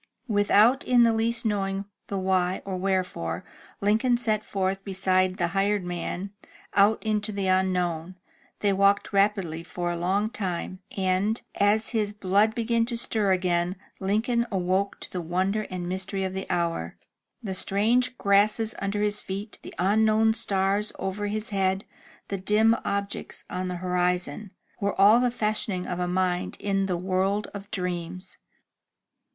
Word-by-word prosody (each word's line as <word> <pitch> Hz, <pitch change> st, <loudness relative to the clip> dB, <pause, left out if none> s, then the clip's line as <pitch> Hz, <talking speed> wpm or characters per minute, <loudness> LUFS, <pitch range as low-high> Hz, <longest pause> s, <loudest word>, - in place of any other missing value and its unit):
'* -, -, -50 dB
Without 215 Hz, +4 st, +4 dB
in 245 Hz, -1 st, +4 dB
the 230 Hz, -1 st, +4 dB
least 225 Hz, +1 st, 0 dB
knowing 195 Hz, -2 st, -1 dB, 0.2 s
the 200 Hz, -, -3 dB
why 185 Hz, -1 st, 0 dB
or 195 Hz, -1 st, -3 dB
wherefore, 180 Hz, -, -2 dB, 0.4 s
Lincoln 225 Hz, +5 st, +3 dB
set 215 Hz, -3 st, 0 dB
forth 195 Hz, -1 st, -2 dB
beside 185 Hz, -1 st, +1 dB
the 175 Hz, -3 st, 0 dB
hired 195 Hz, +1 st, +1 dB
man, 175 Hz, +2 st, -4 dB, 0.4 s
out 205 Hz, +2 st, +4 dB
into 215 Hz, -1 st, 0 dB
the 200 Hz, -1 st, -2 dB
unknown. 180 Hz, -2 st, 0 dB, 0.5 s
They 205 Hz, -1 st, +3 dB
walked 200 Hz, +1 st, +2 dB
rapidly 195 Hz, -5 st, +1 dB
for 175 Hz, +1 st, -3 dB
a -, -, -2 dB
long 195 Hz, +5 st, 0 dB
time, 185 Hz, -2 st, -4 dB, 0.2 s
and, 195 Hz, +4 st, +1 dB
as 210 Hz, +2 st, +2 dB
his 210 Hz, -3 st, -1 dB
blood 205 Hz, +2 st, +2 dB
began 230 Hz, -1 st, +1 dB
to 240 Hz, -1 st, -2 dB
stir 215 Hz, -4 st, +1 dB
again, 180 Hz, -1 st, +1 dB, 0.2 s
Lincoln 225 Hz, +5 st, 0 dB
awoke 190 Hz, +1 st, 0 dB
to -, -, -7 dB
the 180 Hz, -, -3 dB
wonder 190 Hz, +5 st, -1 dB
and 180 Hz, -1 st, -4 dB
mystery 190 Hz, +1 st, -2 dB
of 190 Hz, 0 st, -2 dB
the 190 Hz, 0 st, -5 dB
hour. 170 Hz, -, -1 dB, 0.5 s
The 195 Hz, -3 st, -3 dB
strange 225 Hz, +7 st, +2 dB
grasses 210 Hz, +3 st, +3 dB
under 200 Hz, +1 st, -1 dB
his 210 Hz, 0 st, 0 dB
feet, 200 Hz, +3 st, -6 dB
the -, -, -10 dB
imknown 220 Hz, +4 st, +3 dB
stars 200 Hz, 0 st, +2 dB
over 205 Hz, +2 st, -3 dB
his 215 Hz, +2 st, -3 dB
head, 190 Hz, -1 st, 0 dB, 0.4 s
the 195 Hz, -, -2 dB
dim 215 Hz, +4 st, +4 dB
objects 200 Hz, 0 st, -4 dB
on 185 Hz, 0 st, -2 dB
the 180 Hz, -, -3 dB
horizon, 180 Hz, +1 st, -1 dB, 0.3 s
were 200 Hz, -1 st, -2 dB
all 210 Hz, +4 st, +7 dB
the 250 Hz, 0 st, +2 dB
fashioning 210 Hz, -5 st, -1 dB
of 180 Hz, -, -4 dB
a 180 Hz, -, 0 dB
mind 180 Hz, 0 st, -1 dB
in 195 Hz, -1 st, 0 dB
the 180 Hz, -2 st, -1 dB
world 190 Hz, +3 st, 0 dB
of 200 Hz, 0 st, -8 dB
dreams. 180 Hz, -1 st, -4 dB
195 Hz, 155 wpm, -26 LUFS, 185-210 Hz, 0.5 s, all